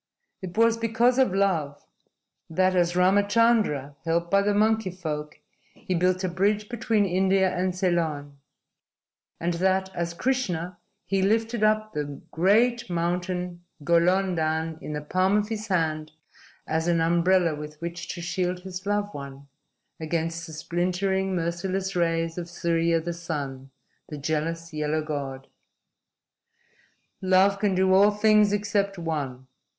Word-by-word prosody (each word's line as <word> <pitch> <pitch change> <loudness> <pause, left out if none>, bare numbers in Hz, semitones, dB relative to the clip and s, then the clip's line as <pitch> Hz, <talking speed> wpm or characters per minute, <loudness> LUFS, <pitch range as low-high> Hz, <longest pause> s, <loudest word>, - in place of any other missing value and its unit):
It 185 +1 -7
was 230 0 +4
because 230 +3 +2
of 260 -6 +4
love 175 -7 0 0.6
that, 185 +3 +2
as 175 -1 +2
Ramachandra, 200 - +2
helped 170 +1 -1
by 200 0 +5
the 205 0 +1
monkey 220 -1 +2
folk, 155 -4 -5 0.4
he 210 -5 -4
built 180 +2 +1
a - - +1
bridge 205 +4 0
between 225 -3 +1
India 190 0 +2
and 180 0 -1
Ceylon, 160 -6 -1 1.0
and 170 +1 -1
that, 190 +2 0
as 170 0 -3
Krishna, 180 -8 -2 0.3
he 195 -1 0
lifted 225 +3 +1
up 215 0 +2
the 145 -2 -4
great 230 +6 +2
mountain 175 +1 -2 0.2
Golonddhan 170 -2 +1
in 150 - -6
the 150 0 -4
palm 185 +6 +2
of 210 +1 -1
his 215 -1 -4
hand 155 -5 -1 0.5
as 160 +1 -1
an 170 -1 +2
umbrella 170 +1 +3
with 150 0 -8
which 170 +1 -5
to 175 - -7
shield 180 +1 -2
his 190 +1 -7
loved 205 0 -1
one 140 0 -9 0.5
against 165 +1 -3
the 160 - -10
splintering, 185 +4 -1
merciless 185 +3 -2
rays 165 -1 0
of 170 0 -6
Surya, 165 -1 +1
the 170 +1 -4
Sun, 140 -6 -5 0.4
the 150 - -6
jealous, 160 +3 -3
yellow 155 +1 -1
god. 140 -3 -5 1.8
"Love 190 +1 +3
can 200 -2 +1
do 190 0 +3
all 200 +2 +6
things 210 0 +4
except 205 -1 0
one. 145 -6 -4
180 Hz, 135 wpm, -26 LUFS, 165-195 Hz, 1.8 s, all